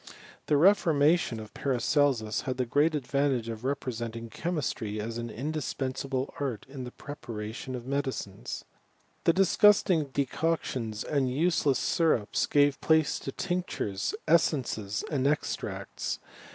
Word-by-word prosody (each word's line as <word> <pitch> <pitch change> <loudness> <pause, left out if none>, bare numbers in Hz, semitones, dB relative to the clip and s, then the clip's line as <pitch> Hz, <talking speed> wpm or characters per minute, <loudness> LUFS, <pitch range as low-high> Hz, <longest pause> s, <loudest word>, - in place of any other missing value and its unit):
The 150 - +4
reformation 160 - +4
of 110 -1 -10
Paracelsus 130 -4 +1
had 130 -1 -2
the 130 - +1
great 145 +6 +3
advan 140 -1 +1
tage 115 -1 -6
of 115 0 -6
representing 115 -4 -3
chemistry 125 -10 -2
as 115 +2 -4
an 120 0 -4
indispensable 135 0 -3
art 130 -7 -3
in 135 -1 -7
the 125 - -7
preparation 120 -3 -6
of 120 -1 -7
medicines. 130 -8 -3 0.6
The 165 - +5
disgusting 195 -3 +5
de 140 0 -1
coctions 125 -8 -2
and 135 -4 0
useless 150 -2 +2
syrups 155 - +1
gave 145 -1 +3
place 160 -1 +3
to 135 - -5
tinctures, 175 - -2
essences, 125 -10 +1
and 140 -2 +1
extracts. 150 +1 -2
135 Hz, 125 wpm, -29 LUFS, 115-150 Hz, 0.6 s, The